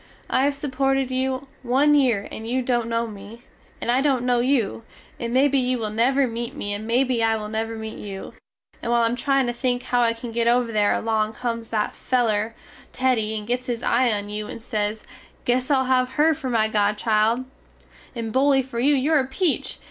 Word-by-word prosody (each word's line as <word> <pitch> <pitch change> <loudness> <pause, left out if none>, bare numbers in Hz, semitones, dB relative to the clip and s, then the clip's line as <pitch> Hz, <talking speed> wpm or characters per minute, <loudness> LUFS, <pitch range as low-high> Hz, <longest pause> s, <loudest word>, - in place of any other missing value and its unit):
I 265 - +3
have 285 0 +1
supported 270 -1 0
you 260 +1 -1
one 270 +4 +3
yere 245 -8 +2
and 220 - -7
you 255 +1 0
dont 240 -2 0
no 230 0 0
me, 215 +2 -10 0.4
and 240 - -1
I 255 +2 +3
dont 270 -4 +1
no 245 -1 +2
you, 245 -4 +1 0.4
and 235 0 -3
mebbe 270 +3 +3
you 255 -2 +2
will 215 -3 -3
never 260 +5 +2
mete 235 -1 -5
me 205 0 -4
and 210 +2 -5
mebbe 250 0 +2
I 225 0 +3
will 210 -1 -6
never 225 +1 -3
mete 220 0 -7
you, 195 -2 -7 0.5
and 235 - -2
while 235 0 +3
I - - +4
am 230 +1 0
tryin 275 +1 +1
to 240 - -1
think 245 0 -1
how 245 -1 +1
I 230 -1 +3
can 230 +1 -8
get 230 0 0
over 240 0 +2
there 210 -2 +2
along 220 -1 0
comes 230 -1 -4
that 215 -2 -1
feler 225 -3 0 0.4
Teddy 235 -4 0
and 210 - -6
gets 250 +3 -2
his 240 -1 -3
eye 245 0 +3
on 205 -1 -2
you 210 0 -5
and 225 - -8
sez, 215 -2 -2 0.4
Guess 250 +2 +1
Ill 270 -2 +3
have 255 -1 +2
her 315 +2 +4
for 275 -3 -5
my 225 -3 +2
godchild, 215 +3 +1 0.7
and 225 -2 -4
Bully 270 0 +4
fer 245 -2 -6
you 285 +4 +4
your 295 +3 +3
a 260 - -1
peach! 320 +4 -1
240 Hz, 210 wpm, -23 LUFS, 220-260 Hz, 0.7 s, I